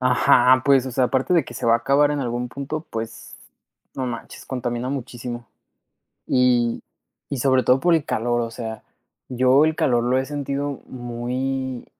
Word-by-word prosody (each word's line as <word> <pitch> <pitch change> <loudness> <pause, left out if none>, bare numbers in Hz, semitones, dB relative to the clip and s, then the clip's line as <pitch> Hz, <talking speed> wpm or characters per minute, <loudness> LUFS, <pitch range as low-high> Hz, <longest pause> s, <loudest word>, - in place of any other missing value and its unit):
ajá, 125 0 +4
pues, 135 -2 +4
o 130 - -5
sea, 130 +1 +2
aparte 130 +7 +1
de 170 - +3
que 120 - -11
se 115 - -4
va 115 - +5
a 115 - +3
acabar 145 +3 +3
en 145 - -2
algún 120 -1 -3
punto, 140 +4 -5
pues, 115 0 -6 0.6
no 130 - -3
manches, 115 -2 -7
contamina 120 -1 -3
muchísimo. 120 -3 -6 0.8
Y, 125 -2 +2 0.5
y 140 - -3
sobre 130 0 +2
todo 130 +1 +4
por 175 +4 +3
el 160 - 0
calor, 120 +1 0
o 115 -1 -4
sea, 110 -1 -6 0.5
yo 130 +3 +4
el 160 0 0
calor 120 -5 +2
lo 125 +2 +1
he 130 - 0
sentido 140 -1 -4
muy, 125 +1 -4
125 Hz, 175 wpm, -22 LUFS, 120-135 Hz, 0.8 s, va